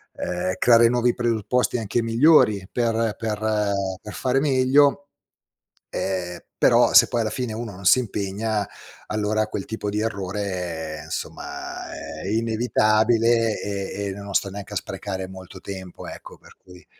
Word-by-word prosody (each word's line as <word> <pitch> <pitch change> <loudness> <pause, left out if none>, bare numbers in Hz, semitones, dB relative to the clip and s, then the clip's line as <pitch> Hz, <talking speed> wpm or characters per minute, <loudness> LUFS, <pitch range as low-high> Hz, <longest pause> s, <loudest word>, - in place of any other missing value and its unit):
ehm, 90 +1 -2
creare 115 -1 +6
nuovi 120 0 +2
presupposti 120 +1 0
anche 115 +1 -1
migliori 115 -5 +4
per 115 -2 0
per 110 -2 -3 0.6
per 105 - -9
fare 130 +1 +1
meglio. 140 +1 +3 0.8
Ehm, 90 -2 -3 0.2
però - - +5
se - - +8
poi, 120 - -1
alla 110 - -1
fine, 125 -1 -3
uno 110 -2 -5
non 95 +1 -11
si 130 - +7
impegna, 105 -1 -2 0.4
allora 110 0 0
quel 100 -2 -5
tipo 110 -2 -4
di 105 +1 -1
errore 90 -7 -3
insomma - - -6 0.3
è - - -5
inevitabile 115 0 +2
e 100 0 -4
e - - -3
non 100 0 -8
sto 100 - +1
neanche 100 +1 -8
a - - 0
sprecare 95 -2 -5
molto 95 0 -11
tempo, 95 -2 -8
ecco. - - -10
Per - - -19
cui 90 -3 -15
110 Hz, 145 wpm, -23 LUFS, 95-115 Hz, 0.8 s, se